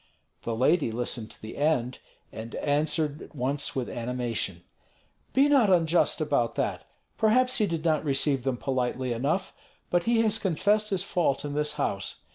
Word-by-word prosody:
The 115 - -3
lady 135 +2 +2
listened 120 -1 -2
to - - -10
the 110 - -9
end, 130 -5 0 0.3
and 115 +1 -8
answered 150 +1 0
at - - -12
once 140 +2 -1
with 130 -2 -2
animation: 115 -7 -3 0.7
"Be 275 +2 +4
not 270 -8 +4
unjust 170 -2 +3
about - - 0
that. - - -2 0.3
Perhaps 250 +4 +3
he 210 - +3
did 165 -2 -3
not 155 -2 +2
receive 135 -2 +1
them 130 -2 -1
politely 125 -1 -1
enough, 145 +11 -1 0.4
but 175 -1 +2
he 230 -1 +3
has 220 -1 +2
confessed 205 +4 +1
his 190 -3 0
fault 170 -8 0
in 145 - -4
this 150 0 0
house. 100 -9 -2
150 Hz, 165 wpm, -27 LUFS, 125-180 Hz, 0.7 s, Be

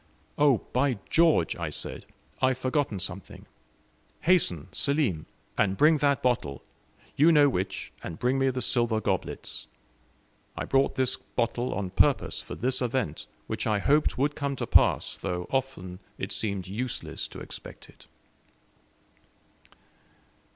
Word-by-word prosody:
"Oh, 140 -6 +3
by 130 -1 +2
George!" 160 - +4
I - - -3
said, - - -5 0.3
"I 130 - +5
have 130 -1 +1
forgotten 130 -4 0
something. 95 0 -6 0.8
Hasten, 150 - +2
Selim, 140 - 0 0.3
and 95 -1 +2
bring 155 +1 +5
that 140 -1 +2
bottle; 115 - 0 0.5
you 155 +4 +6
know 150 -3 +6
which 95 -7 -2
and 80 - -6
bring 125 +2 +1
me 135 0 +3
the 130 0 -2
silver 120 -3 +2
goblets. 95 -3 -3 0.9
I - - -2
brought 135 0 +2
this 130 -1 +1
bottle 120 +1 -2
on 95 -2 -3
purpose - - +2
for - - -8
this 130 +2 -1
event, 120 - -2 0.2
which - - -3
I 105 -1 +2
hoped 145 +9 +2
would 145 +3 +1
come 140 -1 -2
to - - -3
pass, - - +3
though 90 0 -3
often 125 -10 -2 0.2
it 95 - -4
seemed 100 -3 -2
useless 115 +6 -4
to - - -10
expect - - -10
it." - - -19
125 Hz, 140 wpm, -27 LUFS, 100-140 Hz, 0.9 s, you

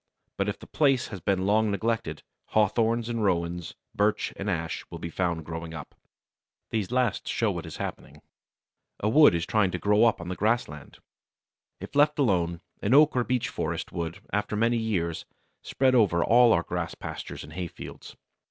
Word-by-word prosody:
But 100 +1 -1
if 105 - -3
the - - -12
place 135 -4 +1
has 100 - -7
been 95 +1 0
long 110 +2 +3
neglected, 110 -6 -2 0.2
Hawthorns 110 +2 +1
and 115 -2 -2
Rowans, 85 -3 -1 0.2
Birch 105 +1 0
and 100 +1 -4
Ash 85 -3 -2
will - - -7
be 85 - -6
found 85 -3 -1
growing 80 0 -6
up. 80 - -9 0.8
These 110 -4 -1
last 125 -3 0
show 115 -3 +1
what 85 -2 -5
is 80 - -8
happening. - - -7 0.8
A 105 - +1
wood 150 - +6
is 85 0 -1
trying 105 -1 +2
to - - -3
grow 105 +2 +3
up 115 - +2
on 85 - -7
the 90 - -3
grassland. 105 - -2 0.8
If - - -9
left 150 +1 +4
alone, 90 - +1 0.2
an 110 +6 +3
oak 150 0 +6
or 125 - +2
beech 125 -1 -1
forest - - -3
would, 85 0 -4 0.2
after 105 +1 -1
many 115 +2 +2
years, 90 -8 -2 0.4
spread 130 -1 +1
over 95 -9 +4
all 120 +1 +6
our 85 - +3
grass 85 -1 -4
pastures - - -7
and 75 +2 -11
hay 90 +1 -3
fields. - - -10
100 Hz, 180 wpm, -27 LUFS, 85-115 Hz, 0.8 s, wood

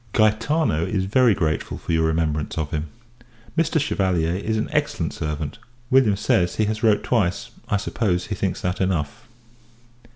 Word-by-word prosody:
_ - - -2
Gaetano 110 - +2
is 95 +1 -1
very 115 +2 +4
grateful 80 -4 -1
for - - -5
your 80 -1 +2
remembrance 80 -2 -1
of 75 -3 -2
him. 75 +1 -2 0.7
Mr. 165 -1 +2
Chevalier 90 - 0
is 110 +3 -1
an 110 - -1
excellent - - -1
servant. 75 +5 -4 0.3
William 130 -6 +5
says, 90 -2 +1
he 110 - +2
has 110 +1 -2
wrote 110 -2 +3
twice; 105 0 0 0.2
I 105 - +2
suppose, 90 -3 -1
he - - -4
thinks 95 -2 -2
that 90 +1 -2
enough. 90 - -2
95 Hz, 165 wpm, -23 LUFS, 80-110 Hz, 0.7 s, William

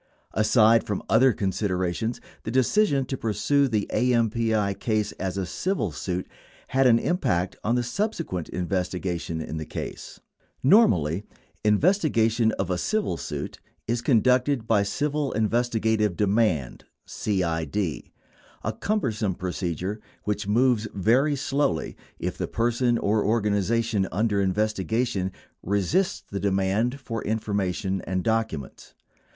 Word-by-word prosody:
Aside 110 +1 +4
from 105 - -3
other 125 +4 +6
considerations, 95 +1 -1 0.2
the - - -5
decision 135 - +2
to 135 - -3
pursue 140 +5 +1
the 110 -5 -1
AMPI 115 -4 +1
case 110 -2 0
as 95 0 -2
a 95 - -1
civil 105 - -2
suit 90 +4 -3 0.4
had 135 0 +3
an 115 -2 +6
impact 95 - 0
on 115 +3 +1
the 125 - +1
subsequent 165 - -3
investigation 90 -2 -2
in 80 0 -5
the 80 - -3
case. - - -7 0.4
Normally, 100 - +4 0.4
investigation 115 - +3
of 95 -1 -2
a 90 - 0
civil 215 - 0
suit 75 - -5 0.3
is 120 +1 0
conducted 125 +1 +3
by 110 -3 +3
Civil 145 +7 -1
Investigative 110 -2 +1
Demand 100 - +1 0.2
(CID) 85 -6 -2
— 90 -8 -6
a 110 - -1
cumbersome 110 - 0
procedure 90 +2 -3 0.2
which 105 -1 -2
moves 115 0 +2
very 125 +10 +3
slowly 140 - -1 0.2
if - - -4
the - - -1
person 120 +1 +1
or 105 0 +1
organization 105 0 +1
under 105 +1 +1
investigation 105 +1 0 0.3
resists 100 - 0
the 100 - -4
demand 100 +6 0
for 115 -4 -5
information 100 -3 -1
and 95 0 -1
documents. 110 - -2
110 Hz, 125 wpm, -25 LUFS, 95-120 Hz, 0.4 s, other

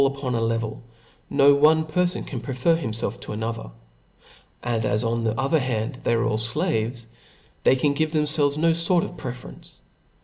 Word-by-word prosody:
8, - - +5
9II 135 0 -1
upon 130 -3 -3
a 115 - 0
level, 115 -1 -2 0.5
no 140 0 +5
one 155 +2 +4
perfon 180 +4 0
can 125 -5 -5
prefer 130 +6 +1
himfelf 115 -8 -3
to - - -6
another; 110 - -4 0.9
and 115 -2 -1
as 105 0 +1
on 115 0 -1
the 110 +1 -1
other 140 +4 +2
hand 125 0 -2
they 120 - +2
are 115 - +1
all 110 0 0 0.2
(laves, 120 -8 -1 0.6
they - - +4
c^n 140 +2 +1
give 155 +1 0
themfclves 150 -2 +1
no 165 +1 +3
fort 170 +1 +2
of - - -6
pre 125 -7 -5
ference. 125 - -13
130 Hz, 190 wpm, -24 LUFS, 115-155 Hz, 0.9 s, 8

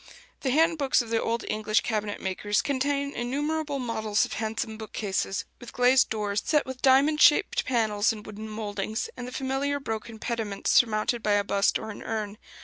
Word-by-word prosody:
The 265 - -2
hand 320 +4 +3
books 270 -3 +2
of 230 - -10
the 225 - +2
old 230 +1 -1
English 215 0 +1
cabinet 210 -2 -2
makers 205 +4 -1
contain 280 +1 -1
innumerable 290 +4 -2
models 220 -4 0
of - - -7
handsome 220 0 -3
bookcases, 210 -3 -3
with 245 - -11
glazed 250 +1 +4
doors 205 -2 -1
set 300 -2 +2
with 260 -1 -7
diamond 280 +3 +4
shaped 295 - +5
panes 220 -4 +2
in 215 -2 -7
wooden 215 +1 -8
mouldings, 215 - -4
and 245 - -6
the - - -7
familiar 270 +2 -1
broken 225 -3 -5
pediment 220 -3 -4
surmounted 225 0 +3
by 210 -1 +1
a 205 0 +3
bust 200 0 +2
or 220 - -6
an 205 - -9
urn. 215 -2 -4
225 Hz, 180 wpm, -27 LUFS, 215-265 Hz, -, shaped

